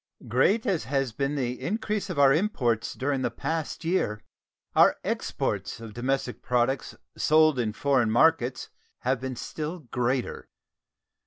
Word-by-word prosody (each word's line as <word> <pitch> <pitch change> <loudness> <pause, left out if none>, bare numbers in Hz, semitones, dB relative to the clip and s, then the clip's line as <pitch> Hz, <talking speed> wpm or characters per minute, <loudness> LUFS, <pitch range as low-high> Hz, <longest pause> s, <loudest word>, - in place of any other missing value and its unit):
Great 195 - +2
as 190 -8 0
has 135 -2 0
been 140 +5 -2
the 125 -2 -2
increase 210 - -2
of - - -4
our 140 -1 +6
imports 130 - 0
during 135 0 -1
the - - +1
past 160 0 -4
year, 165 - 0 0.6
our - - +6
exports - - -2
of 115 -2 -9
domestic 125 +2 -2
products 125 +1 0 0.2
sold 155 -3 +4
in 110 -3 0
foreign 130 -1 +2
markets 130 +1 +2 0.3
have 130 0 0
been 130 -1 -4
still 155 +7 -5
greater. 125 +1 -1
135 Hz, 140 wpm, -27 LUFS, 125-155 Hz, 0.6 s, our